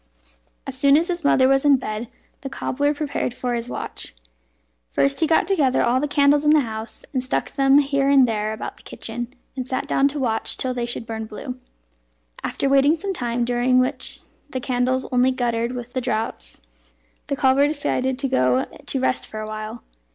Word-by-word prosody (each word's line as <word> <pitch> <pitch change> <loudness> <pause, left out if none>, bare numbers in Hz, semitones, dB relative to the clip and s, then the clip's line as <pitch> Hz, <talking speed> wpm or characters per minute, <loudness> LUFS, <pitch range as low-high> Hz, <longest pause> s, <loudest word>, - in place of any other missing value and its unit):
As - - -6
soon 280 0 +5
as 340 +4 0
his 345 -1 -2
mother 265 -2 +4
was 270 0 +3
in 290 -1 +6
bed, 225 -2 -4 0.3
the 270 - -5
cobbler 285 +1 -1
prepared 285 -4 -2
for 245 -1 -2
his 235 0 -3
watch. - - -6 0.7
First 275 0 +1
he 320 - +2
got 320 - +3
together 295 -10 +2
all 240 +2 +2
the 295 - 0
candles 285 0 +3
in 300 - +3
the 305 0 +6
house, 220 -2 -6
and 255 -2 0
stuck 255 - -1
them 275 0 +4
here 275 -1 +2
and 270 -3 +6
there 215 -1 -1
about 220 - -6
the - - -15
kitchen, 240 +2 -6 0.2
and 255 -2 -4
sat 260 - -2
down 275 - +3
to 285 +1 -3
watch 225 -4 -1
till 255 -1 -1
they 240 -1 -2
should 235 -1 -4
burn 220 -1 -5
blue. 250 +4 -7 0.8
After - - -1
waiting 275 +3 +4
some 390 +4 -3
time, 240 -6 -1
during 245 +1 +2
which 255 +1 -1 0.3
the 260 - -3
candles 255 +1 0
only 250 0 +4
guttered 240 -2 -1
with 245 0 -7
the 255 - -1
draughts, 220 - -3 0.7
the 280 - -1
cobbler 270 +1 +4
decided 265 -3 -1
to 270 +1 -1
go 130 - +2 0.2
to 270 - -1
rest 255 0 0
for 215 - -7
a 215 - -5
while. 215 +2 -6
255 Hz, 195 wpm, -22 LUFS, 235-280 Hz, 0.8 s, in